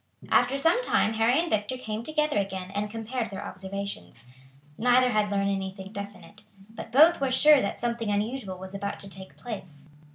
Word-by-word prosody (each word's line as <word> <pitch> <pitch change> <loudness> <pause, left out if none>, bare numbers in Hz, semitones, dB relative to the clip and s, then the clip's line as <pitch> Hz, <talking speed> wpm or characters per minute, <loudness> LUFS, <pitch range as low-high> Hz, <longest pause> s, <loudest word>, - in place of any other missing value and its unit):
After 245 +3 +4
some 330 - +3
time 225 - +2
Harry 225 +5 +3
and 345 - 0
Victor 215 -1 -1
came 220 -3 -4
together 300 -1 0
again 190 -1 -4
and 205 +1 -2
compared 225 +1 -4
their 195 - -6
observations. 190 - -6 0.5
Neither 250 +3 +4
had 210 -2 +1
learned 200 0 +1
anything 190 0 -5
definite, 205 0 -9 0.3
but 225 0 -9
both 310 +5 +6
were 270 - +1
sure 290 +2 +6
that 200 - -3
something 235 -2 -2
unusual 205 -1 -2
was 190 +1 -9
about 200 +1 -4
to 195 - -9
take 190 0 -10
place. 180 - -8
215 Hz, 175 wpm, -27 LUFS, 195-250 Hz, 0.5 s, both